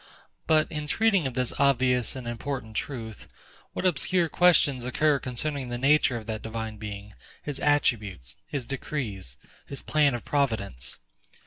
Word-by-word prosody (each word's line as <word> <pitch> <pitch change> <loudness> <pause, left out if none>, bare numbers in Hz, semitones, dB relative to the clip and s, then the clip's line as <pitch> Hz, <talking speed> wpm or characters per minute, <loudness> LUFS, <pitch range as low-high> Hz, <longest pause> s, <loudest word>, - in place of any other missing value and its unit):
But, 155 0 +3
in 150 -2 -4
treating 200 -2 +3
of 130 - -6
this 125 -1 0
obvious 125 -4 +3
and 130 -2 -6
important 120 -1 -4
truth, 110 -4 -5 0.5
what - - -3
obscure 175 +1 +2
questions 150 -8 +4
occur 145 +3 +2
concerning 130 +1 -3
the 120 - -2
nature 135 -1 +4
of 110 - -8
that 110 -1 -4
Divine 110 -1 -5
Being, 105 -1 -7 0.3
his 145 -2 -4
attributes, 105 - +1
his 135 -4 -3
decrees, 115 - -4 0.3
his 140 - -7
plan 145 -4 +3
of 120 - -6
providence? 110 - -1
130 Hz, 145 wpm, -27 LUFS, 110-145 Hz, 0.5 s, questions